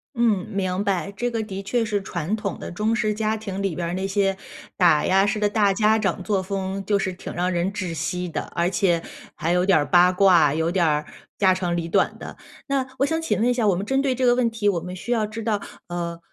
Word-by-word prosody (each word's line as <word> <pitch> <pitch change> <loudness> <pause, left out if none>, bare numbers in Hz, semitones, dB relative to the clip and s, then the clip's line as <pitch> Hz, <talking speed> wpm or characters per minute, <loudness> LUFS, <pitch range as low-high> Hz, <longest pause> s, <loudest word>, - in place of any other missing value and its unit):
嗯， 220 -6 +2
明 190 -1 -1
白。 195 0 -1
这 245 +4 -1
个 225 -2 -2
的 195 -2 -6
确 230 +4 0
是 205 -2 -1
传 190 +1 -3
统 200 -4 -4
的 - - -7
中 215 +5 0
式 215 -3 0
家 215 +1 -1
庭 200 -2 -5
里 195 -5 -1
边 170 0 -3
儿 - - -3
那 190 +1 -2
些 195 0 +1 0.4
打 165 -5 +4
压 195 +1 +4
式 210 +1 -1
的 210 - +2
大 205 -1 +2
家 215 +2 +3
长 190 -3 -1
作 200 -2 0
风 195 0 -3
就 205 +1 +2
是 190 -1 -2
挺 180 - -8
让 180 +1 -1
人 175 +2 0
窒 185 -5 -4
息 180 +3 -3
的， 165 - -3
而 170 +1 +1
且 175 -2 +1 0.3
还 165 - -1
有 180 +1 +2
点 190 -5 +5
儿 145 - +1
八 180 +2 +5
卦， 180 -6 +5
有 160 +2 0
点 180 -2 +2
儿 150 -1 +1 0.3
家 190 -2 +4
长 175 -2 -1
里 165 -1 -3
短 - - +1
的。 - - -9 0.3
那 270 -2 0
我 275 - +4
想 320 +2 -1
请 210 - -1
问 235 - +2
一 - - +3
下， 235 -4 +1
我 195 - +3
们 190 +3 -3
针 270 +4 +1
对 265 -2 0
这 255 - 0
个 245 - +5
问 245 -2 +2
题， 225 -2 -2
我 180 -4 +2
们 180 +2 -7
需 235 +7 -6
要 220 -3 +1
知 220 +1 -6
道， 210 -3 0 0.3
呃， 170 -1 -4
195 Hz, 275 characters per minute, -23 LUFS, 180-215 Hz, 0.4 s, 点